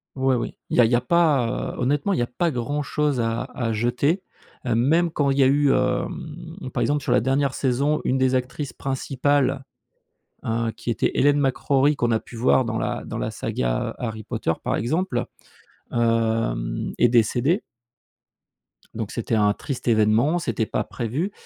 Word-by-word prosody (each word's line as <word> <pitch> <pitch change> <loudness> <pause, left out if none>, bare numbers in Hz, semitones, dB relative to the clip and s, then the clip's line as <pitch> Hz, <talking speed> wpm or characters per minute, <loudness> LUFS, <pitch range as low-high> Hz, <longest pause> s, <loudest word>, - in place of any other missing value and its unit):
oui 130 -1 +2
oui, 120 - -4
il - - -1
y - - +5
a - - +6
il 115 - 0
y - - +5
a 120 - +2
pas, 140 -5 +1
heu, - - -10
honnêtement, 145 +9 +1
il - - 0
y - - +2
a 120 - 0
pas 170 +8 0
grand 145 +3 -2
chose 145 -2 0
à 115 +1 -1
à 115 -3 -2
jeter. 125 - 0 0.4
Heu, 120 - +1
même 160 +8 +3
quand 145 -3 +1
il 135 - +1
y 140 - +5
a 130 - +5
eu, 140 0 +3
hem, 160 +5 -2
par - - -1
exemple, 145 -1 +1
sur 125 - -1
la - - +5
dernière 135 +3 +1
saison, 140 +3 0
une 130 - +1
des 130 0 +2
actrices 130 +3 -3
principales, 135 0 0 0.8
heu, 115 0 0
qui - - -4
était 115 - 0
Hélène 145 +1 +3
McRaury 140 +1 +2
qu'on 120 -2 0
a 110 - +2
pu 120 - -13
voir 125 +2 +3
dans 115 -1 -2
la - - -2
dans - - -5
la - - -2
saga, - - -2
heu, - - -4
Harry 110 -2 -5
Potter, - - -1
par - - 0
exemple, 165 - -1 0.7
hem, 115 - 0
est 120 - +4
décédée. 120 - +2 1.3
Donc 110 -2 -4
c'était 115 -1 -2
un 105 -1 +3
triste 130 +4 -6
événement, 115 +9 +3
c'était 115 -8 -1
pas 105 - -2
prévu. 130 - -3
130 Hz, 190 wpm, -23 LUFS, 115-145 Hz, 1.3 s, a